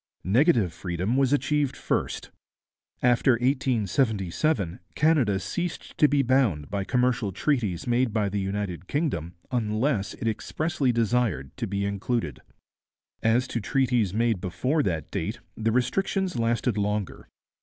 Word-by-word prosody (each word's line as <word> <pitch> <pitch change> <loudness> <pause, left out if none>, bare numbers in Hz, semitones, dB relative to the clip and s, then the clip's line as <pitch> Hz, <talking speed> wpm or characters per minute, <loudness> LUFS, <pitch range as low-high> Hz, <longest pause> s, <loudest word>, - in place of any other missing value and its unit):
Negative 115 - +3
freedom 90 +6 -2
was 135 -1 +3
achieved 145 0 +1
first. - - -2 0.7
After 125 +1 +4
1877 115 - 0 0.2
Canada 140 -11 +3
ceased 170 - -4
to 150 - +7
be 145 -1 +2
bound 120 - +1
by 100 -1 -1
commercial 125 -1 +1
treaties 105 - -1
made 120 0 +2
by 105 -1 +1
the 100 +1 -2
United 95 -2 -3
Kingdom 125 - -2 0.2
unless 110 -1 0
it 115 - -4
expressly 135 +6 0
desired 115 - 0
to - - -2
be 100 +1 -1
included. 100 - -2 0.8
As 120 +3 +2
to 115 - -2
treaties 120 -3 +1
made 110 -2 +1
before 115 - 0
that 80 - -2
date, 105 +8 -3 0.2
the 115 0 0
restrictions 185 - 0
lasted 115 -1 0
longer. 105 -1 -2
115 Hz, 130 wpm, -26 LUFS, 100-130 Hz, 0.8 s, to